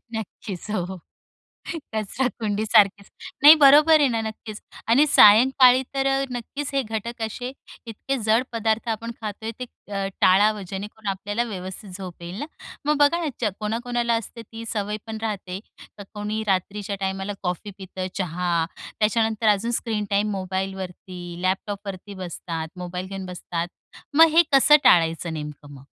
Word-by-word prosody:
नक्कीच 210 Hz, -2 st, -6 dB
हो, 190 Hz, -2 st, -3 dB, 1.0 s
कचराकुंडीसारखेच. 215 Hz, -3 st, +1 dB, 0.3 s
नाही 295 Hz, +2 st, +11 dB
बरोबर 300 Hz, +3 st, +7 dB
आहे 285 Hz, -, +4 dB
ना, 230 Hz, -2 st, -1 dB
नक्कीच 220 Hz, -1 st, -7 dB, 0.3 s
आणि 275 Hz, +6 st, +5 dB
सायंकाळी 255 Hz, +2 st, +7 dB
तर 270 Hz, 0 st, 0 dB
अ, 270 Hz, 0 st, +2 dB
नक्कीच 260 Hz, +4 st, -5 dB
हे 275 Hz, -, +2 dB
घटक 225 Hz, +1 st, -5 dB
असे 245 Hz, +3 st, -4 dB, 0.3 s
इतके 230 Hz, +4 st, -3 dB
जड 225 Hz, +3 st, +4 dB
पदार्थ 225 Hz, 0 st, 0 dB
आपण 230 Hz, +1 st, -3 dB
खातोय 220 Hz, +1 st, -5 dB
ते -, -, -2 dB, 0.3 s
अ, 195 Hz, -1 st, -1 dB
टाळावं, 205 Hz, +3 st, +4 dB
जेणेकरून 205 Hz, +2 st, -7 dB
आपल्याला 205 Hz, +4 st, -3 dB
व्यवस्थित 190 Hz, +1 st, -7 dB
झोप 180 Hz, -3 st, -9 dB
येईल 175 Hz, +4 st, -7 dB
ना? 290 Hz, -, -4 dB, 0.4 s
मग 300 Hz, +1 st, +2 dB
बघा 290 Hz, +4 st, +4 dB
ना, -, -, -1 dB
ज 220 Hz, -4 st, +1 dB
कोणाकोणाला 235 Hz, +2 st, -1 dB
असते 230 Hz, +2 st, -10 dB
ती 225 Hz, +1 st, -10 dB
सवय 210 Hz, -1 st, -2 dB
पण 220 Hz, 0 st, -5 dB
राहते 195 Hz, -4 st, -4 dB, 0.4 s
तर -, -, -7 dB
कोणी 210 Hz, +1 st, -3 dB
रात्रीच्या 200 Hz, +1 st, -1 dB
टायमाला 195 Hz, +1 st, -2 dB
कॉफी 180 Hz, +2 st, -3 dB
पितं, 190 Hz, -1 st, -6 dB
चहा, 180 Hz, -1 st, -2 dB, 0.5 s
त्याच्यानंतर 220 Hz, 0 st, +2 dB
अजून 210 Hz, +3 st, +2 dB
स्क्रीन 220 Hz, -3 st, -2 dB
टाईम 205 Hz, +1 st, +1 dB
मोबाईलवरती, 190 Hz, -1 st, -5 dB, 0.2 s
लॅपटॉपवरती 195 Hz, +1 st, -3 dB
बसतात, 165 Hz, -2 st, -5 dB
मोबाईल 180 Hz, +1 st, -5 dB
घेऊन 195 Hz, -1 st, -6 dB
बसतात, 175 Hz, -1 st, -4 dB, 0.5 s
मग 325 Hz, +2 st, +8 dB
हे 340 Hz, -, +9 dB
कसं 275 Hz, +2 st, +7 dB
टाळायचं 165 Hz, 0 st, +4 dB
नेमकं 150 Hz, -1 st, -8 dB
मग? 135 Hz, -1 st, -13 dB
210 Hz, 145 wpm, -24 LUFS, 190-230 Hz, 1.0 s, नाही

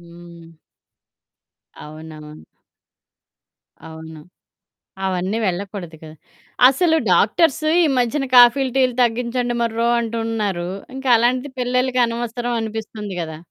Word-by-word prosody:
హ్మ్. 170 Hz, -1 st, -15 dB, 1.3 s
అవునవును. 155 Hz, 0 st, -11 dB, 1.4 s
అవును. 160 Hz, 0 st, -11 dB, 0.9 s
అవన్నీ 190 Hz, +3 st, -2 dB
వెళ్ళకూడదు 185 Hz, -2 st, -4 dB
కదా! 155 Hz, 0 st, -11 dB, 0.5 s
అసలు 320 Hz, +5 st, +2 dB, 0.2 s
డాక్టర్స్‌ 275 Hz, -, +2 dB, 0.2 s
ఈ -, -, +3 dB
మధ్యన 255 Hz, +3 st, 0 dB
కాఫీ‌లు, 250 Hz, +2 st, +6 dB
టీ‌లు 255 Hz, -2 st, +2 dB
తగ్గించండి 240 Hz, +1 st, -1 dB
మొర్రో 230 Hz, 0 st, 0 dB
అంటున్నారు. 225 Hz, -6 st, -3 dB, 0.3 s
ఇంక 265 Hz, 0 st, -8 dB
అలాంటిది 250 Hz, +4 st, 0 dB
పిల్లలకి 250 Hz, +1 st, 0 dB
అనవసరం 240 Hz, +1 st, -4 dB
అనిపిస్తుంది 220 Hz, -2 st, -6 dB
గదా! 160 Hz, -2 st, -6 dB
225 Hz, 95 wpm, -20 LUFS, 175-245 Hz, 1.4 s, కాఫీ‌లు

